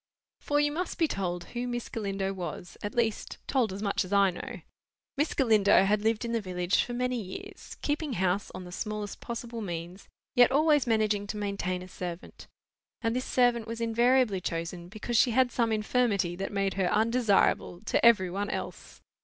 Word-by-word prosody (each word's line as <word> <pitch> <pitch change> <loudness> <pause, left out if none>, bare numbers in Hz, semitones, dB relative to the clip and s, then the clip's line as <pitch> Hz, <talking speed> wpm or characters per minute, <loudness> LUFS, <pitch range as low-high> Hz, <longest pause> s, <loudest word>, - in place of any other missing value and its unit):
For, 290 0 0
you 295 0 +2
must 355 +5 -3
be 330 - +3
told 180 -7 -3
who 245 +1 -2
Miss 240 -1 -3
Galindo 195 -3 -2
was; 175 -1 -6
at 205 - -5
least, 230 -3 -1
told 250 -7 +1
as 195 +2 -5
much 200 -1 +1
as 185 - -10
I 200 -1 +4
know. 175 - -7 0.5
Miss 295 +2 0
Galindo 210 -6 +5
had 205 +1 +2
lived 225 +2 +1
in 230 - -3
the 230 -1 0
village 180 -1 +1
for 240 - -6
many 250 0 -1
years, 370 - -9
keeping 295 -1 -1
house 190 0 0
on 185 - -6
the 180 - -10
smallest 210 +1 -4
possible 235 -1 -6
means, 175 0 -6 0.3
yet 245 0 +6
always 295 -1 +3
managing 215 -3 +1
to 210 - -4
maintain 195 -3 -2
a - - -10
servant. 180 -1 -7 0.6
And 225 +1 +1
this 255 - -1
servant 240 -2 +2
was 230 0 -5
invariably 230 -2 +2
chosen 170 +1 -4
because 220 +3 -2
she 245 - +5
had 255 -2 +4
some 230 -2 +1
infirmity 215 -5 +1
that 195 +2 -4
made 195 -1 0
her 190 -2 0
undesirable 220 -5 +2
to 215 - 0
every 205 -6 +5
one 200 +2 -2
else. - - -6
215 Hz, 185 wpm, -29 LUFS, 190-240 Hz, 0.6 s, yet